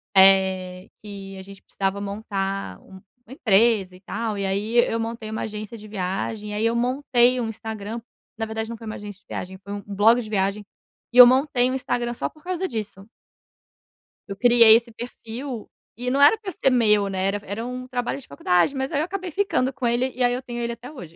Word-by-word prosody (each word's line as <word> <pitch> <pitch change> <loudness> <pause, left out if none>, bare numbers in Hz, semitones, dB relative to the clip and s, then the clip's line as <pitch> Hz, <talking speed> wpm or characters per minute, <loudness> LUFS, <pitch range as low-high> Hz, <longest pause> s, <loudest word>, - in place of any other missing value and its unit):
eh, 190 0 +4
que 195 -2 -9
a - - -8
gente 195 0 -13
precisava 195 0 -2
montar 195 - -4
um 190 -1 -14 0.2
uma 255 - -11
empresa 210 -6 +3
e - - -15
tal, 220 +2 -3
e 195 - -2
aí 210 +5 -1
eu 230 - -1
montei 225 -1 -4
uma 220 - -3
agência 215 +1 -6
de 215 0 -12
viagem, 205 +2 -3
e - - -5
aí 220 +2 0
eu 230 - +1
montei 250 0 +2
um 235 - -1
Instagram 220 0 -6 0.4
na 225 - -2
verdade 220 0 -4
não 235 - -5
foi 225 - -11
uma 215 - -5
agência 205 -1 -9
de - - -44
viagem, 190 +1 -6
foi 200 +1 -7
um 205 - -5
blog 210 +4 +4
de 215 - -9
viagem 200 0 -1 0.5
e - - -2
eu 250 - +13
montei 255 -1 +3
um - - -1
Instagram 240 -2 -2
só - - -3
por 310 - -22
causa 370 +1 -2
disso. 210 -4 -6 1.2
Eu 200 - -5
criei 235 0 +7
esse 235 0 0
perfil 240 +1 -7 0.3
e 250 +2 -3
não 275 +2 +1
era 295 +10 +7
para 405 -3 -6
ser 270 - +1
meu, 210 -5 +3
né, 190 -1 -2
era 200 +1 0
era 210 +4 -5
um 250 0 -6
trabalho 245 +1 -3
de - - -15
faculdade, 175 - +1
mas 265 +3 -2
aí 290 - 0
eu 310 - +1
acabei 370 -1 -5
ficando 295 -9 0
com 255 -3 -2
ele, 245 +2 +1
e 250 - -1
aí 245 - +3
eu 250 - -3
tenho 240 -1 -5
ele 235 0 -2
até 245 +5 -11
hoje. 170 - -11
225 Hz, 220 wpm, -23 LUFS, 200-245 Hz, 1.2 s, eu